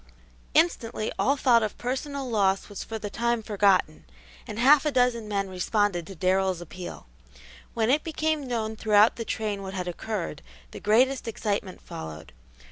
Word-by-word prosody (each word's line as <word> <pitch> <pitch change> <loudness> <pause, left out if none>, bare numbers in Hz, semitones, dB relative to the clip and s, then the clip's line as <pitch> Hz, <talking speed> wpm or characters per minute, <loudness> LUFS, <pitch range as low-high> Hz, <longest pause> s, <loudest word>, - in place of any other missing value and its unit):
Instantly 230 -10 +1
all 275 +2 +2
thought 245 -4 +4
of 215 -2 -3
personal 270 +2 -3
loss 195 -4 +1
was 205 - -6
for 225 - -5
the 205 -1 -6
time 235 -1 0
forgotten, 200 -6 +2 0.4
and - - -6
half 275 +4 +6
a 305 - +1
dozen 245 -4 +1
men 200 -2 -1
responded 185 -1 0
to 195 - -9
Darrell's 185 +1 +1
appeal. 175 +1 -8 0.7
When 225 +1 +2
it 295 +3 +2
became 315 -3 -1
known 220 -3 -2
throughout 215 0 +4
the 230 - -4
train 210 -3 -2
what 190 0 -6
had 180 -1 -3
occurred, 190 +1 -4 0.3
the - - -8
greatest 250 +5 +2
excitement 205 -4 -3
followed. 80 -1 -8
215 Hz, 160 wpm, -26 LUFS, 195-245 Hz, 0.7 s, half